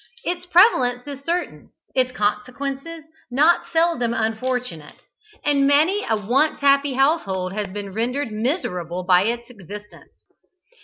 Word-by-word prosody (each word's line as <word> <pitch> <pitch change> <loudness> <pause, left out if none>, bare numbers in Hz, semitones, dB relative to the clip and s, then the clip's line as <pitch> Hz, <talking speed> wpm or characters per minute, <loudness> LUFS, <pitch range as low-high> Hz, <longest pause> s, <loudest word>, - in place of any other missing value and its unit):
Its 355 0 -3
prevalence 260 - +4
is 280 -1 -8
certain, 345 +3 -3 0.2
its 255 -1 +1
consequences 270 +8 -3 0.3
not 300 +7 +3
seldom 325 -9 +1
unfortunate, 225 -7 -3 0.5
and 280 -1 +3
many 320 +9 +3
a 220 - +2
once 245 +9 +1
happy 280 0 +3
household 200 - +1
has 210 0 -3
been 200 0 -7
rendered 245 +4 -2
miserable 185 - -2
by 180 0 +4
its 235 +1 -2
existence. 210 -1 -12
250 Hz, 120 wpm, -22 LUFS, 210-290 Hz, 0.5 s, prevalence